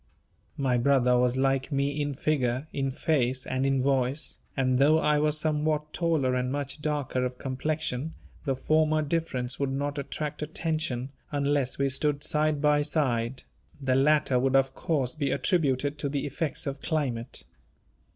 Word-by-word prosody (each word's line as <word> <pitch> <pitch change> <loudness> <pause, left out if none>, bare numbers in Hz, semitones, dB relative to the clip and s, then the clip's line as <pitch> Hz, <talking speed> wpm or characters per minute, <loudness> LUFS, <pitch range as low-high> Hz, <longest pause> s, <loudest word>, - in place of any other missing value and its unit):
My 130 -3 +1
brother 125 -1 +3
was 125 +1 +2
like 135 +1 +1
me 140 +1 0
in 145 -1 -2
figure, 130 -2 0
in 135 -1 -1
face, 130 -2 0
and 130 +1 0
in 135 -1 +1
voice; 135 +1 0 0.2
and 130 -1 +2
though 150 +3 +5
I 150 -1 +2
was 150 0 +2
somewhat 150 0 0
taller 160 -7 +1
and 125 0 0
much 140 +1 -3
darker 145 -4 -1
of 125 0 -3
complexion, 140 +2 -2 0.3
the 135 -3 0
former 155 +3 +2
difference 140 -5 -2
would 140 -1 0
not 145 +2 -2
attract 150 +2 -4
attention, 150 -5 -2 0.2
unless 140 -2 0
we 140 - +2
stood 145 +2 +1
side 150 -1 +1
by 150 0 +4
side; 130 -5 0 0.4
the 135 -2 0
latter 135 -1 +3
would 135 +1 +1
of 135 0 +3
course 135 -6 -1
be 145 -3 -1
attributed 145 -1 0
to 140 - -1
the 140 0 -2
effects 145 +2 -3
of 140 -1 -4
climate. 130 -7 -2
140 Hz, 160 wpm, -28 LUFS, 130-150 Hz, 0.4 s, though